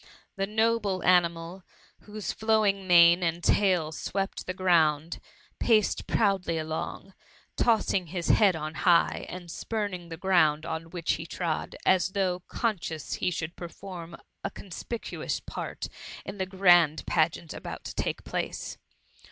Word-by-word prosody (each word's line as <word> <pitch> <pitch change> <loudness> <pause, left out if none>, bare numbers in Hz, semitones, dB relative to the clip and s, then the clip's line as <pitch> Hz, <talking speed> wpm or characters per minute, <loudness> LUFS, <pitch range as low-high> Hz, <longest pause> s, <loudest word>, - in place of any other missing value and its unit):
The 195 -1 -1
noble 215 -3 +1
animal, 170 0 +2 0.4
whose 210 -1 -4
flowing 215 -3 +1
mane 170 0 +7
and 170 0 -1
tail 180 -6 +2
swept 195 +5 -3
the 185 - -2
ground, 165 -4 +2 0.4
paced 215 -3 +2
proudly 195 -6 +1
along, 160 +4 -4 0.4
tossing 210 -6 +2
his 175 +1 -3
head 200 -5 +5
on 155 0 -4
high, 170 0 +2
and 175 -2 -8
spuming 200 -4 -4
the 165 - -6
ground 160 -4 +3
on 160 0 -4
which 170 -1 -1
he 160 - -7
trod, 165 -3 -3
as 190 0 +3
though 185 -3 0
conscious 170 - -2
he - - 0
should 170 -1 -4
perform 175 -1 -8 0.3
a - - -1
conspicuous 210 +5 -5
part - - -6 0.4
in 195 0 -7
the 190 - -1
grand 175 -5 +4
pageant 160 0 0
about - - -7
to - - -6
tak^ - - -3
place. - - -4
180 Hz, 135 wpm, -28 LUFS, 165-195 Hz, 0.4 s, mane